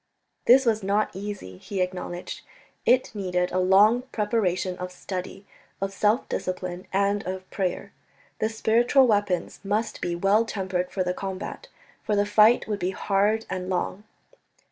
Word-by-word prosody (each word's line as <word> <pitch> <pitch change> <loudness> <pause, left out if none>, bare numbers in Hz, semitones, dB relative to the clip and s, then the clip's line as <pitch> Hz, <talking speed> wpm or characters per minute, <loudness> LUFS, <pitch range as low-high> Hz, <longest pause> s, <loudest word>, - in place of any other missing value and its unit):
This 260 +2 +6
was 220 -2 +2
not 200 0 0
easy, 190 - -6
he 200 - -5
acknowledged; 180 -1 -4 0.5
it 250 0 +3
needed 180 -3 -1
a 185 - 0
long 200 +6 +5
preparation 195 -4 0
of 180 0 -5
study, 185 +1 -6 0.3
of 195 0 -3
self 210 +5 +1
discipline 180 0 -4
and 200 +1 +1
of 185 0 -5
prayer. 185 -3 -3 0.5
The 220 - +1
spiritual 235 +4 +3
weapons 205 -6 0
must 210 +3 -1
be 175 -1 -1
well 195 +5 +3
tempered 190 -5 -2
for 190 - -1
the 180 0 -1
combat, 195 - -6 0.3
for 210 - -1
the 205 0 +2
fight 210 +3 +5
would 210 -2 -2
be 180 0 0
hard 205 +3 +1
and 185 -1 -4
long. 185 +2 -2
195 Hz, 150 wpm, -25 LUFS, 185-215 Hz, 0.5 s, This